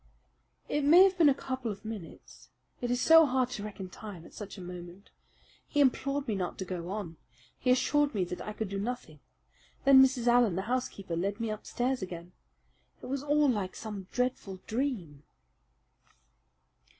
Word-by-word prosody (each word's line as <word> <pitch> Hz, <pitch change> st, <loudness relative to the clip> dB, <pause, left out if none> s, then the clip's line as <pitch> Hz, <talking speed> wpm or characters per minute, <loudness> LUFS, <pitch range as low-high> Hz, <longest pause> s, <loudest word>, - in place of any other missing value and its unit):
"It 295 Hz, -, 0 dB
may 335 Hz, +6 st, +8 dB
have 385 Hz, -1 st, +4 dB
been 315 Hz, -3 st, +7 dB
a -, -, +5 dB
couple 260 Hz, -3 st, -4 dB
of 200 Hz, +1 st, -10 dB
minutes. 215 Hz, -6 st, -9 dB, 0.3 s
It 245 Hz, -, -2 dB
is 245 Hz, 0 st, +1 dB
so 325 Hz, +2 st, +7 dB
hard 255 Hz, -1 st, +1 dB
to 205 Hz, -, -5 dB
reckon 200 Hz, -3 st, -6 dB
time 185 Hz, -3 st, -10 dB
at -, -, -15 dB
such 210 Hz, 0 st, -8 dB
a -, -, -8 dB
moment. 180 Hz, +2 st, -10 dB, 0.6 s
He 290 Hz, -, -1 dB
implored 275 Hz, +1 st, +2 dB
me 220 Hz, -, 0 dB
not 185 Hz, -3 st, -3 dB
to 190 Hz, -, -4 dB
go 175 Hz, -1 st, -5 dB
on. 190 Hz, -5 st, -5 dB, 0.4 s
He 255 Hz, -, -1 dB
assured 285 Hz, +2 st, +3 dB
me 195 Hz, -, +1 dB
that 180 Hz, 0 st, -5 dB
I 210 Hz, -, -5 dB
could 220 Hz, 0 st, -3 dB
do 195 Hz, 0 st, -4 dB
nothing. 205 Hz, -9 st, -5 dB, 0.7 s
Then 270 Hz, -1 st, +9 dB
Mrs. 260 Hz, -2 st, +1 dB
Allen, 240 Hz, -6 st, +4 dB
the 190 Hz, -, -2 dB
housekeeper, 215 Hz, -6 st, -3 dB
led 195 Hz, +5 st, -2 dB
me 230 Hz, -1 st, -2 dB
upstairs 245 Hz, +4 st, -2 dB
again. 175 Hz, -1 st, -7 dB, 0.7 s
It -, -, -7 dB
was 275 Hz, 0 st, -2 dB
all 295 Hz, +1 st, +3 dB
like 205 Hz, -7 st, -1 dB
some 205 Hz, -4 st, -7 dB
dreadful 245 Hz, -7 st, -2 dB
dream." 215 Hz, -, -3 dB
220 Hz, 175 wpm, -30 LUFS, 190-260 Hz, 0.7 s, Then